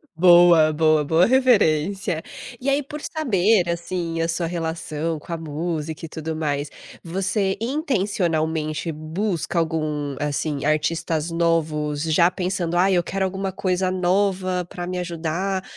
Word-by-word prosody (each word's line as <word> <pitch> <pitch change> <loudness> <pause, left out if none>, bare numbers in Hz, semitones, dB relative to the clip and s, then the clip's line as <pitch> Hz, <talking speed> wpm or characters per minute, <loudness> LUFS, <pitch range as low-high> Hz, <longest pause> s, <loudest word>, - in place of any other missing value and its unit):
Boa, 175 -2 +6
boa, 155 -1 +3
boa, 165 +4 +4
referência. 195 - +2 0.4
E 265 - -1
aí, 280 +1 +2
por 300 +2 -8
saber, 215 - +1
assim, 170 -1 -3
a 165 - +1
sua 170 +1 -1
relação 165 -1 -3
com 170 - -12
a - - -2
música 160 0 -4
e - - -9
tudo 160 0 -5
mais, 145 -2 -2 0.3
você 190 +3 -1
intencionalmente 175 - -1
busca 165 +4 -3
algum, 155 -3 -1
assim, 145 0 -2
artistas 155 +1 0
novos 155 -3 0
já 165 +2 +4
pensando: 180 -2 -2
"Ai, 190 +2 +4
eu 175 - +2
quero 195 +2 -1
alguma 190 +1 -3
coisa 185 0 0
nova 185 0 0
pra 175 0 -7
me 180 0 -3
ajudar, 175 +3 -2
170 Hz, 135 wpm, -22 LUFS, 155-185 Hz, 0.4 s, Boa